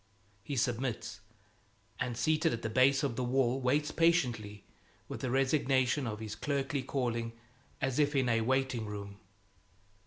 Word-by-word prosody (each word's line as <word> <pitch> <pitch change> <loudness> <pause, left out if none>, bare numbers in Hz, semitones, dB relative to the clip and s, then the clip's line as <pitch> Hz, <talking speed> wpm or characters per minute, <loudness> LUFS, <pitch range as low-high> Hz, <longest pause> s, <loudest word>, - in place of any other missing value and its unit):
He 140 - -4
submits, 120 -3 -1 0.8
and 120 -2 -2
seated 155 +4 +2
at 115 - -4
the 110 - -2
base 135 +4 +4
of 135 -5 0
the 130 - 0
wall 130 +1 +1
waits 145 +4 +1
patiently, 120 - +1 0.4
with - - -6
the 130 - -1
resignation 135 0 +2
of 105 -1 -4
his 110 -1 -5
clerkly 140 +2 -1
calling, 120 -3 -2 0.5
as 135 +1 0
if 145 0 +2
in 130 -2 +2
a 115 -1 +2
waiting 130 -2 0
room. 100 -1 -7
130 Hz, 150 wpm, -32 LUFS, 115-135 Hz, 0.8 s, base